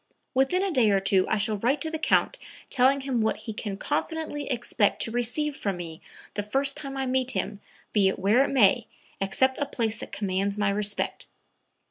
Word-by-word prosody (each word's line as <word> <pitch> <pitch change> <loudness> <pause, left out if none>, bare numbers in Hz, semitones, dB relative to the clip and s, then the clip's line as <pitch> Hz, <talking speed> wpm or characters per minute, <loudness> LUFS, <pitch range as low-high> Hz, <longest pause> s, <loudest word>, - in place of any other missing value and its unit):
Within 270 +8 +2
a 395 - 0
day 250 -8 +4
or 200 -1 +4
two 195 -1 +2
I 220 - +1
shall 215 0 0
write 250 +8 +1
to 320 - -2
the 320 - -3
Count - - +2 0.3
telling 270 +1 +3
him 265 -4 -1
what 220 - +1
he 220 - -4
can 205 -2 -5
confidently 295 +2 -3
expect 240 -5 +1
to 225 - -3
receive 245 +5 -1
from 200 -7 -2
me 165 -2 -7 0.3
the 205 - -2
first 270 +7 0
time 275 -2 -6
I 265 - -1
meet 260 0 0
him, 205 -3 -3 0.3
be 205 -3 +4
it 190 - 0
where 210 +7 +4
it - - 0
may, 240 -3 +4 0.3
except 260 +7 +1
a 285 - +1
place 225 -2 -2
that - - -8
commands 200 0 -1
my 205 -1 +2
respect." 205 0 0
235 Hz, 200 wpm, -27 LUFS, 205-275 Hz, 0.3 s, day